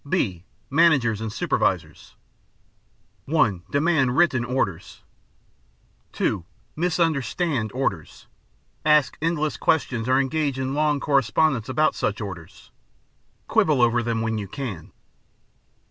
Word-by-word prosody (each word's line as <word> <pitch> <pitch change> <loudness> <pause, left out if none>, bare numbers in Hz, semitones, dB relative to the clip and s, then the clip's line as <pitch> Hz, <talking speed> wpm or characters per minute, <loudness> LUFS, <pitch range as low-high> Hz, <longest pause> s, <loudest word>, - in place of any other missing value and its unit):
(b) 95 - -1 0.3
Managers 140 -9 +3
and 110 -1 -4
Supervisors - - -2 1.1
(1) 115 - +1
Demand 145 -4 +1
written 140 -8 +3
orders. 120 -9 -3 1.1
(2) 95 -5 -1 0.3
"Misunderstand" 160 - 0
orders. 100 - -3 0.6
Ask 150 -2 +3
endless 155 -2 -1
questions 125 -7 0
or 130 - +4
engage 140 0 -1
in 130 0 -2
long 150 0 +1
correspondence 135 -2 +1
about 155 +4 +2
such 105 - -2
orders. 95 -6 -9 0.8
Quibble 150 -4 +2
over 120 0 +3
them 115 -1 -2
when 110 -1 -1
you 100 - -5
can. 100 - -6
130 Hz, 105 wpm, -23 LUFS, 110-155 Hz, 1.1 s, or